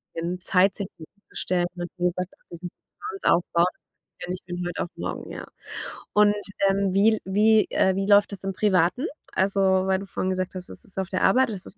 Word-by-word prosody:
ähm, 170 Hz, +2 st, -3 dB
Zeit, 190 Hz, +1 st, +3 dB
sich 200 Hz, -3 st, -3 dB
hinzustellen. 175 Hz, 0 st, -3 dB
Und 175 Hz, -1 st, -5 dB
wie 180 Hz, -, -1 dB
gesagt 180 Hz, +1 st, -1 dB
auch -, -, -27 dB
diesen 175 Hz, +1 st, -7 dB, 0.3 s
Vertrauensaufbau, 180 Hz, -, +1 dB
das -, -, -31 dB
passiert -, -, -37 dB
ja -, -, -10 dB
nicht 180 Hz, 0 st, -4 dB
von 175 Hz, 0 st, -4 dB
heut 175 Hz, -, -5 dB
auf -, -, -2 dB
morgen, -, -, -5 dB
ja. -, -, -7 dB, 0.7 s
Und, 210 Hz, 0 st, +5 dB, 0.4 s
ähm, 195 Hz, -1 st, +1 dB
wie 210 Hz, +3 st, +5 dB
l -, -, -6 dB
wie, 215 Hz, +3 st, +4 dB
äh 190 Hz, 0 st, +3 dB
wie 195 Hz, 0 st, -1 dB
läuft 205 Hz, 0 st, +5 dB
das 195 Hz, -1 st, -4 dB
im 195 Hz, -, -1 dB
Privaten? 190 Hz, -, +2 dB, 0.3 s
Also, 195 Hz, +1 st, +2 dB
weil 190 Hz, 0 st, +3 dB
du 200 Hz, -, -7 dB
vorhin 185 Hz, -, -2 dB
gesagt 185 Hz, 0 st, -2 dB
hast, 180 Hz, -1 st, -7 dB
das -, -, -11 dB
ist 195 Hz, -, -16 dB
auf 190 Hz, -, -2 dB
der 185 Hz, -, -1 dB
Arbeit, 255 Hz, +5 st, +4 dB
das 195 Hz, -4 st, -5 dB
ist 200 Hz, -, -6 dB
190 Hz, 220 wpm, -25 LUFS, 180-200 Hz, 0.7 s, Und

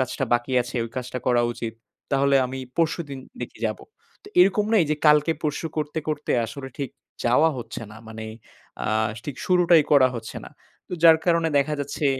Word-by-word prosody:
কাজটা 130 Hz, +1 st, -1 dB
বাকি 120 Hz, +2 st, -1 dB
আছে, 125 Hz, +1 st, -10 dB
ওই 115 Hz, -, -8 dB
কাজটা 125 Hz, 0 st, -4 dB
করা 120 Hz, -1 st, +3 dB
উচিত। 115 Hz, -1 st, -5 dB, 0.4 s
তাহলে 140 Hz, 0 st, +4 dB
আমি 130 Hz, +1 st, -6 dB, 0.2 s
পরশুদিন 160 Hz, -4 st, -1 dB, 0.2 s
দেখি -, -, -7 dB
যাবো। -, -, -5 dB, 0.4 s
তো -, -, -11 dB
এরকম 200 Hz, +3 st, +4 dB
না 225 Hz, -, +4 dB
এই -, -, -1 dB
যে -, -, -1 dB
কালকে 150 Hz, +2 st, +5 dB
পরশু 150 Hz, +2 st, -2 dB
করতে, 150 Hz, +1 st, -2 dB
করতে 150 Hz, -1 st, -2 dB
আসলে 140 Hz, 0 st, -7 dB
ঠিক 135 Hz, -4 st, -3 dB, 0.3 s
যাওয়া 135 Hz, +7 st, +4 dB
হচ্ছে 115 Hz, -, -7 dB
না। -, -, -11 dB
মানে 110 Hz, 0 st, -7 dB, 0.6 s
আ -, -, -2 dB, 0.4 s
ঠিক 140 Hz, -3 st, -6 dB
শুরুটাই 175 Hz, -3 st, +5 dB
করা 130 Hz, -3 st, +6 dB
হচ্ছে 115 Hz, -1 st, -7 dB
না। -, -, -11 dB, 0.4 s
তো -, -, -11 dB
যার 160 Hz, -1 st, +8 dB
কারণে 165 Hz, -1 st, +3 dB
দেখা 150 Hz, +2 st, +1 dB
যাচ্ছে 145 Hz, +1 st, -2 dB
140 Hz, 185 wpm, -24 LUFS, 125-160 Hz, 0.6 s, যার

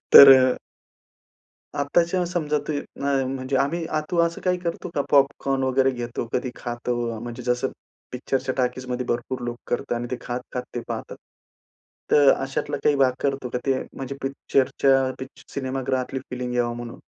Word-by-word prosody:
तर 140 Hz, -1 st, +13 dB
अ, 130 Hz, -1 st, +3 dB, 1.3 s
आत्ताच्या 170 Hz, +5 st, +2 dB
समजा 155 Hz, -4 st, 0 dB
ते 155 Hz, -, 0 dB, 0.3 s
आम 135 Hz, -1 st, +1 dB
म्हणजे 130 Hz, +1 st, -2 dB
आम्ही 165 Hz, +5 st, 0 dB
आ 155 Hz, -, -1 dB
तु 175 Hz, -, 0 dB
असं 170 Hz, 0 st, -1 dB
काही 180 Hz, -1 st, +1 dB
करतो 170 Hz, 0 st, -4 dB
का? -, -, +1 dB
पॉपकॉर्न 135 Hz, -1 st, +3 dB
वगैरे 130 Hz, 0 st, +3 dB
घेतो, 120 Hz, -2 st, -4 dB
कधी 125 Hz, 0 st, -1 dB
खातो? 120 Hz, 0 st, -3 dB, 0.3 s
म्हणजे 120 Hz, +1 st, -6 dB
जसं 125 Hz, +2 st, 0 dB, 0.4 s
पिक्चरच्या 130 Hz, +1 st, -2 dB
टॉकीजमध्ये 125 Hz, 0 st, -1 dB
भरपूर 120 Hz, +2 st, -2 dB
लोकं 120 Hz, 0 st, -5 dB
करतात -, -, -4 dB
आणि 120 Hz, -, -3 dB
ते 125 Hz, -, -1 dB
खात-खात 125 Hz, 0 st, -4 dB
ते 120 Hz, -, -2 dB
पाहतात. -, -, -5 dB, 0.9 s
तर 145 Hz, -2 st, +7 dB
अशातला 135 Hz, 0 st, -3 dB
काही 145 Hz, -, +4 dB
भाग 130 Hz, -2 st, +4 dB
करतो 135 Hz, -2 st, -1 dB
का? 125 Hz, -, -2 dB
ते 135 Hz, -1 st, +2 dB
म्हणजे 135 Hz, 0 st, -6 dB
पिक्चरच्या 135 Hz, 0 st, +2 dB
पिक्चर 130 Hz, 0 st, -11 dB
सिनेमागृहातली 130 Hz, -1 st, -2 dB
फीलिंग 125 Hz, -1 st, -3 dB
यावा 120 Hz, -1 st, +1 dB
म्हणून? 120 Hz, -1 st, -7 dB
130 Hz, 160 wpm, -24 LUFS, 125-140 Hz, 1.3 s, तर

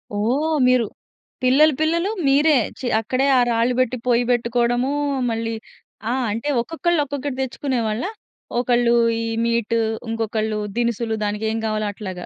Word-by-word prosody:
ఓహ్! 275 Hz, +10 st, +1 dB
మీరు 250 Hz, -3 st, +4 dB, 0.6 s
పిల్లలు 290 Hz, +4 st, +5 dB
పిల్లలు 335 Hz, +5 st, +1 dB, 0.2 s
మీరే 290 Hz, +2 st, +4 dB, 0.2 s
చె 255 Hz, -, -3 dB
అక్కడే 255 Hz, +5 st, 0 dB
ఆ -, -, +5 dB
రాళ్ళు 235 Hz, +2 st, +2 dB
పెట్టి 255 Hz, 0 st, +1 dB
పొయ్యి 245 Hz, 0 st, +3 dB
పెట్టుకోవడము 240 Hz, +2 st, +1 dB, 0.4 s
మళ్ళీ, 225 Hz, 0 st, -2 dB, 0.6 s
ఆ! -, -, +1 dB, 0.2 s
అంటే 230 Hz, +7 st, -3 dB
ఒక్కొక్కళ్ళు 330 Hz, +4 st, 0 dB
ఒక్కొక్కటి 280 Hz, -1 st, -4 dB
తెచ్చుకునేవాళ్ళ? 245 Hz, -3 st, -2 dB, 0.6 s
ఒకళ్ళు 240 Hz, -1 st, +2 dB, 0.3 s
ఈ -, -, -2 dB, 0.2 s
మీట్ 230 Hz, -1 st, 0 dB, 0.3 s
ఇంకొకళ్ళు 220 Hz, -1 st, -1 dB, 0.2 s
దినుసులు 235 Hz, -1 st, 0 dB
దానికి 210 Hz, +1 st, -2 dB
ఏం 225 Hz, -, -2 dB
గావాలో 215 Hz, -1 st, -1 dB
అట్లాగా. 185 Hz, -4 st, -7 dB
240 Hz, 130 wpm, -21 LUFS, 225-270 Hz, 0.6 s, పిల్లలు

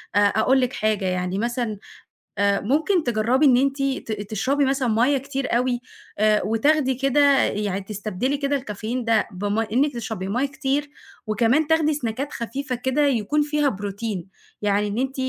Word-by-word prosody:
أ -, -, +5 dB
أقول 220 Hz, +6 st, +3 dB
لِك 250 Hz, 0 st, -1 dB
حاجة 215 Hz, -3 st, 0 dB
يعني 180 Hz, +1 st, -1 dB
مثلًا 235 Hz, -1 st, -2 dB, 0.6 s
أ 200 Hz, 0 st, +2 dB
ممكن 315 Hz, -, +1 dB
تجربي 240 Hz, +5 st, +2 dB
إن 250 Hz, -3 st, +6 dB
أنتِ 275 Hz, +1 st, +1 dB
ت 265 Hz, -4 st, -2 dB, 0.2 s
تشربي 270 Hz, +7 st, +1 dB
مثلًا 265 Hz, -1 st, 0 dB
ميَّة 240 Hz, +6 st, +3 dB
كتير 270 Hz, -2 st, -2 dB
أوي 245 Hz, -1 st, 0 dB, 0.4 s
أ 215 Hz, 0 st, +3 dB
وتاخدي 260 Hz, +5 st, +2 dB
كده 275 Hz, +1 st, +3 dB
يعني 200 Hz, -1 st, -1 dB
تستبدلي 215 Hz, +6 st, -3 dB
كده 280 Hz, 0 st, 0 dB
الكافيين 240 Hz, -1 st, -4 dB
ده 225 Hz, -2 st, +2 dB
بمي 205 Hz, +4 st, -1 dB
إنِك 280 Hz, +3 st, +2 dB
تشربي 220 Hz, -5 st, -5 dB
ميَّة 250 Hz, +7 st, 0 dB
كتير، 275 Hz, +1 st, -2 dB, 0.4 s
وكمان 235 Hz, +8 st, +2 dB
تاخدي 320 Hz, -1 st, +3 dB
سناكات 270 Hz, +1 st, -3 dB
خفيفة 255 Hz, +2 st, -4 dB
كده 260 Hz, +4 st, 0 dB
يكون 275 Hz, +4 st, +1 dB
فيها 295 Hz, -1 st, +1 dB
بروتين، 200 Hz, -2 st, -5 dB, 0.3 s
يعني 205 Hz, 0 st, +1 dB
إن 205 Hz, +2 st, -4 dB
أنتِ 265 Hz, +1 st, -2 dB
245 Hz, 160 wpm, -23 LUFS, 215-275 Hz, 0.6 s, إن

